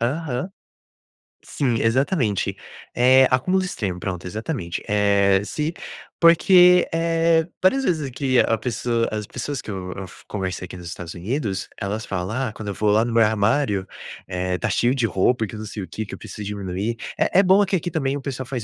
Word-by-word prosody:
Aham. 135 +5 -2 0.9
Sim, 125 -6 -1
exatamente. 115 - +1 0.4
Eh, 130 +1 +6
acúmulos 185 +9 +2
extremo, 95 - -3
pronto, 90 -1 -4
exatamente. 105 - -4
Eh, 100 -1 +3
se 150 +9 -3 0.5
porque, 180 +2 +6
eh, 165 0 +2 0.2
várias 270 +8 +3
vezes 155 - -1
que 130 0 0
a 115 - +3
pessoa 115 -1 -1
as 105 -1 -3
pessoas 140 +5 -5
que - - -7
eu 90 -2 -5
eu 95 - -7
f 95 - -13
conversei 95 -3 -4
aqui 90 - -10
nos 90 - -10
Estados 85 0 -7
Unidos, 100 - -3
elas 105 +3 -3
falam: 90 -1 -3 0.2
"Ah, - - -10
quando 110 -2 -8
eu 100 - -3
vou 105 +1 +1
lá 110 +2 +4
no 120 - -2
meu 115 0 +4
armário, 105 -1 +1 0.4
eh, 90 -1 -2
tá - - -1
cheio 120 +2 +2
de 125 -4 +1
roupa, 110 +4 +1
e - - -1
que 105 - -9
não 110 0 -6
sei 105 -1 -6
o 95 - -6
que, 110 +6 -5
que - - -10
eu - - -6
preciso 105 - -8
diminuir". 100 +2 -3 0.2
É 185 - +3
é - - +6
bom 195 +2 +5
que 195 - 0
aqui 175 0 -2
também 140 -4 -1
o 145 - -4
pessoal 130 -1 -5
faz 120 -3 -4
115 Hz, 200 wpm, -22 LUFS, 100-145 Hz, 0.9 s, Eh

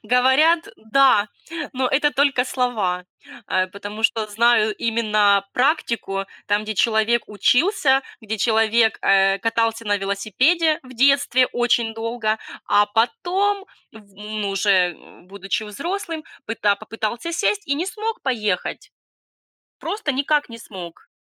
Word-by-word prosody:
говорят, 265 +7 +3
да, 220 -2 +3 0.4
но 255 -1 0
это 295 +2 +2
только 275 -3 +2
слова. 215 -9 -1 0.4
Э, 185 0 +1
потому 205 +3 -8
что 220 -1 +1
знаю 220 0 +2
именно 210 -3 +2
практику, 235 -8 0 0.2
там, 205 +1 +1
где 215 0 -4
человек 225 +2 +2
учился, 270 - +2 0.2
где 220 -1 -5
человек, 225 +1 +2
э, 195 0 +3
катался 225 +1 -1
на 205 - +2
велосипеде 235 - +1
в 255 -1 -14
детстве 270 0 +3
очень 235 -2 +1
долго, 225 -1 -2 0.3
а 205 0 +4
потом 390 - 0 0.3
в 205 -3 -17
ну, 210 0 -4
уже, 195 -2 +2
м, 175 - -19
будучи 195 +2 -4
взрослым, 330 - -5 0.2
пыта 205 -3 +1
попытался 225 +10 -5
сесть 410 +4 0
и 280 - +1
не 335 +5 -2
смог 435 +3 -4
поехать. 215 -8 -2 0.9
Просто 405 -7 -3
никак 290 +1 0
не 230 - -9
смог. 180 -7 -11
225 Hz, 125 wpm, -21 LUFS, 205-275 Hz, 0.9 s, а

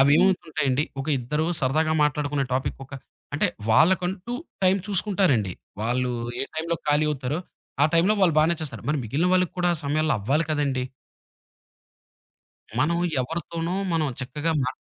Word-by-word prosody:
అవేమవుతుంటాయండి? 150 -2 +3 0.2
ఒక 135 - -5
ఇద్దరు 150 +6 -1
సరదాగా 155 +4 +1
మాట్లాడుకునే 145 -1 0
టాపిక్ 130 - -2
ఒక - - -22 0.4
అంటే - - +2 0.2
వాళ్ళకంటూ 185 - +2 0.3
టైమ్ 185 +1 +4
చూసుకుంటారండి. 185 - +2 0.3
వాళ్ళు 125 +2 0 0.3
ఏ - - +1
టైమ్‌లో 165 +2 -1
ఖాళీ 150 +1 +3
అవుతారో, 135 +1 -2 0.4
ఆ - - +7
టైమ్‌లో 170 +5 +4
వాళ్ళు 170 -5 +4
బానే 160 +2 +4
చేస్తారు. 150 -3 -5
మరి 150 0 +1
మిగిలిన 145 +11 0
వాళ్ళకి 180 -2 +2
కూడా 175 0 +2
ఆ - - -5
సమయంలో 155 +2 +1
అవ్వాలి 140 +10 +1
కదండీ! 140 -4 0 1.9
మనం 170 +5 +2 0.2
ఎవరితోనో 165 +4 -3 0.2
మనం 155 -3 +1
చక్కగా 145 +5 -2
మ 130 +1 -1
155 Hz, 135 wpm, -25 LUFS, 135-170 Hz, 1.9 s, ఆ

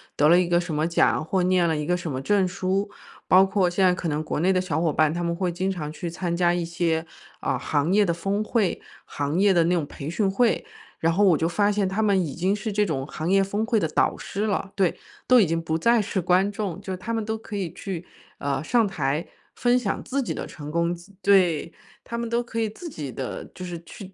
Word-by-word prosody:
得 150 +1 +4
了 175 +2 +7
一 180 - +1
个 175 0 +3
什 170 - -5
么 155 +2 +1
奖 170 - +2
或 185 +2 0
念 180 -1 +3
了 160 - +1
一 150 0 -2
个 180 +3 +1
什 175 -2 -5
么 130 -1 -3
证 195 +4 +2
书， 190 +3 -1 0.4
包 190 +1 +7
括 190 -2 +1
现 185 +2 0
在 180 - +5
可 180 - -3
能 150 0 -1
国 155 - -3
内 185 +3 +3
的 185 - +2
小 160 -4 -1
伙 160 -4 +1
伴， 155 -1 +3
他 175 - -3
们 170 0 -1
会 180 0 -1
经 185 +3 -2
常 160 -6 -4
去 170 +2 -5
参 170 0 -3
加 175 0 +2
一 175 - -1
些， 165 -1 -1 0.4
啊， - - 0
行 145 +4 0
业 210 0 +5
的 170 - +1
峰 195 +5 -1
会， 215 -3 0 0.2
行 145 +3 -3
业 200 +1 +5
的 170 -2 +4
那 180 - +2
种 165 -4 0
培 140 +1 -7
训 195 +2 0
会。 235 +3 +2 0.3
然 165 +1 +2
后 205 +5 +3
我 175 -6 +5
就 160 - 0
发 190 +5 +2
现 205 -2 +1
他 195 +3 -1
们 205 -3 +3
已 140 - -5
经 190 +4 0
是 215 +1 -4
这 210 +1 +2
种 135 -7 -2
行 155 +2 -4
业 195 +1 +4
峰 205 +3 -1
会 230 -1 +1
的 - - +1
导 - - +1
师 205 +3 -3
了。 195 -1 -2
对， 190 -4 +1 0.3
都 250 -2 +7
已 - - +4
经 165 0 -1
不 160 0 -1
再 235 +6 +3
是 195 -2 -2
观 185 +3 +3
众， 200 -4 -3
就 190 -1 -5
他 205 +6 -5
们 225 -1 -1
都 220 +1 -2
可 215 -1 -7
以 185 -5 -3
去， 180 -3 -6 0.3
呃， 140 +1 -2
上 230 +4 +2
台 150 -3 -2 0.3
分 245 0 +3
享 215 -6 -2
自 275 +2 -1
己 - - -3
的 - - -5
成 150 -1 -8
功， 170 +1 0
自 175 +4 -15
对， 180 -5 +3 0.3
他 235 - -5
们 235 0 -3
都 235 +1 +1
可 230 -1 -4
以 220 - 0
自 335 - -9
己 150 - -6
的 130 -1 -5
就 185 - -8
是 175 -2 -5
去 195 +1 -11
180 Hz, 280 characters per minute, -25 LUFS, 165-205 Hz, 0.4 s, 了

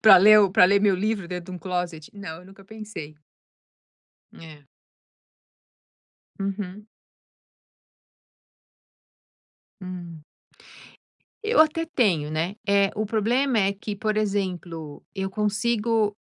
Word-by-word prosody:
Pra 205 -4 +9
ler 215 +3 +8
o 200 -2 +4
pra 205 0 +6
ler 200 +2 +4
meu 200 -2 +3
livro 200 0 -1
dentro 180 0 -6
de - - -7
closet? 175 -3 -4
Não, 180 -6 -8
eu - - -17
nunca 195 +1 -16
pensei. 210 -8 -9 1.2
É. 155 -3 -13 1.7
Uhum. 195 0 -5 3.0
Hum. 175 -4 -8 1.2
Eu 445 +2 +2
até 320 +1 +4
tenho 205 - +1
né. 165 +5 -2
Eh, 200 -1 +3
o 215 +1 -1
problema 235 +5 +1
é 195 0 +2
que 205 +1 -6
por 215 +1 -1
exemplo 180 -7 -3
eu 190 -1 -3
consigo 215 +1 0
200 Hz, 110 wpm, -24 LUFS, 180-215 Hz, 3.0 s, Pra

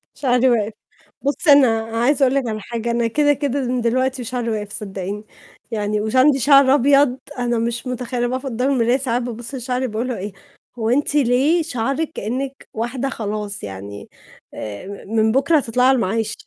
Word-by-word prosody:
شعري 255 -1 +2
وقف. 220 -3 +1 0.5
بُصّي 290 +3 +2
أنا 255 -6 +6 0.2
عايزة 275 +4 +2
أقول 260 +1 +1
لِك 270 -3 0
على 215 -1 -3
حاجة، 235 +2 -3
أنا 235 0 +1
كده، 290 +5 +3
كده 280 -1 -2
من 250 0 -1
دلوقتي 255 +2 0
شعري 240 0 -3
وقف، 210 -2 -3
صدّقيني، 200 0 -5 0.5
يعني 210 -1 -1
وش 220 +3 -3
عندي 270 +2 +5
شعر 275 0 +6
أبيض، 275 -1 +3 0.2
أنا 240 -1 0
مش 235 +2 -2
متخيّلة 250 -1 -2
أنا - - +1
باقف 260 +2 -3
قدّام 255 +1 -1
المراية 245 -1 +2
ساعات 250 -2 -1
بابُصّ 240 +2 -5
لشعري 255 0 -2
بيقولوا 235 +2 -3
إيه: 200 +2 -6 0.5
"هو 220 0 0
أنتِ 285 +4 +1
ليه 280 +5 +3
شعرِك 275 +2 -2
كإنِك 265 +5 -4
واحدة 240 +4 -2
خلاص 210 -3 -4
يعني، 100 +1 -8 0.4
آآ 150 - -7
م 220 - -5
من 220 0 +3
بُكرة 280 +6 +3
هتطلعي 250 -2 +2
على 265 - +5
المعاش." 220 -1 -1
245 Hz, 180 wpm, -20 LUFS, 220-270 Hz, 0.5 s, أنا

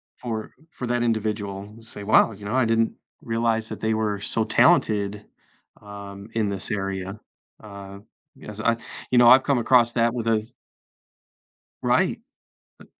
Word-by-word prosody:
for 110 -3 -5 0.2
for 125 - -6
that 120 0 0
individual, 105 -3 -2
say, 110 -2 -9
"Wow", 110 +1 +5
you 100 -1 -11
know, 110 +5 -2
"I 130 - +3
didn't 115 0 +1 0.3
realize 115 -1 0
that - - -7
they 110 0 +1
were 110 -2 -1
so 110 +1 0
talented, 105 -3 +2 0.6
um, 100 0 -10
in 110 -2 0
this 100 +2 -2
area," 95 0 -3 0.4
uh, 100 -2 -10 0.4
because 105 0 -8
I 115 +1 +2 0.3
you 125 - +3
know, 120 -1 +7
I've 130 +1 +7
come 140 -1 +1
across 120 0 +4
that 115 0 +2
with 115 -2 -4
a 110 -1 +1 1.4
Right. - - +2 0.6
Uh - - -15
110 Hz, 150 wpm, -24 LUFS, 100-115 Hz, 1.4 s, know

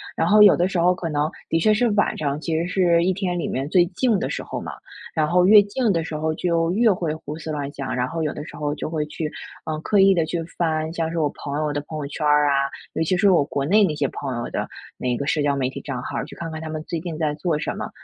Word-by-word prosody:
然 - - +1
后 210 0 +6
有 205 -2 +8
的 180 +2 +1
时 185 - -1
候 180 +2 +4
可 170 -2 -4
能 150 0 0 0.2
的 165 - +2
确 215 +6 +4
是 235 +3 +2
晚 205 0 +1
上 145 -1 -2
其 160 0 -2
实 165 - 0
是 175 -2 +2
一 185 - +2
天 180 -2 -2
里 170 - -2
面 135 +2 -2
最 175 +1 +5
静 215 +5 +1
的 - - -2
时 - - -3
候 - - -5
嘛， - - -6 0.4
然 155 -2 +1
后 180 +3 +3
越 210 +2 +9
静 215 +3 0
的 165 -3 0
时 155 - -5
候 155 +1 -1
就 165 -1 0
越 225 +5 +3
会 170 -5 -1
胡 155 -1 -7
思 160 -1 -6
乱 145 -2 -3
想， 135 -2 -4
然 125 0 0
后 165 +3 -3
有 150 - -1
的 150 - -7
时 - - -10
候 145 -1 -2
就 - - -4
会 155 -2 -2
去， 155 0 -4 0.4
嗯， 155 -1 -3
刻 205 +4 +2
意 195 0 +6
地 170 -3 +1
去 165 +1 -2 0.2
翻 160 -2 0
像 165 -1 -2
是 170 - -4
我 150 -2 +2
朋 145 0 -3
友 150 -1 -1
的 145 - -2
朋 155 +2 -8
友 145 - -4
圈 150 +2 -4
儿 150 0 +4
啊， 140 - +3 0.4
尤 - - 0
其 180 +3 +1
是 200 +2 +4
我 170 -5 +4
国 140 -1 -2
内 205 +7 +4
那 175 -6 +2
些 145 -2 0
朋 135 0 -5
友 120 - -4
的 - - -2 0.3
那 125 -1 -1
个 140 - -3
社 150 +2 +1
交 145 -1 +1
媒 130 -2 0
体 130 - -7
账 130 -4 -5
号， - - -3
去 - - -12
看 165 -1 -6
看 160 - -5
他 160 - -6
们 155 0 -5
最 170 - -3
近 165 -1 -5
在 155 -2 0
做 160 0 -1
什 - - -3
么。 - - -4
160 Hz, 320 characters per minute, -23 LUFS, 150-180 Hz, 0.4 s, 越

